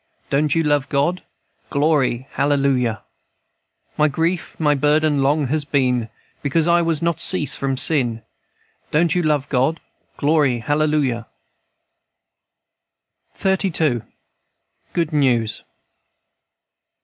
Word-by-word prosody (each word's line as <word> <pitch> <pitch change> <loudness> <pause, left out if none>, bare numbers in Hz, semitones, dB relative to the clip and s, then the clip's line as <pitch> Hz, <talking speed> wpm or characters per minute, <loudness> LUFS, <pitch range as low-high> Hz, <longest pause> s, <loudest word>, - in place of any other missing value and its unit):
Don't 145 +1 +1
you 165 - +2
love 145 -2 +1
God? 150 +6 0 0.5
Glory, 140 -4 +1
hallelujah! 135 -5 0 1.0
"My 150 - +5
grief 165 +4 -2
my 150 -2 +3
burden 150 +1 +2
long 145 +2 +2
has 155 +1 0
been, 125 -5 0 0.3
Because 155 +3 0
I 170 0 +4
was 165 -2 -1
not 170 -1 0
cease 155 -7 +1
from 135 -1 -2
sin. 120 -7 +1 0.7
Don't 165 +2 +2
you 180 - +1
love 150 -4 0
God? 135 +4 +1 0.4
Glory, 145 -4 +2
hallelujahl" 145 -3 0 2.1
XXXII. 170 - +1 0.9
GOOD 165 -2 -1
NEWS. 120 -7 +1
145 Hz, 100 wpm, -20 LUFS, 135-160 Hz, 2.1 s, My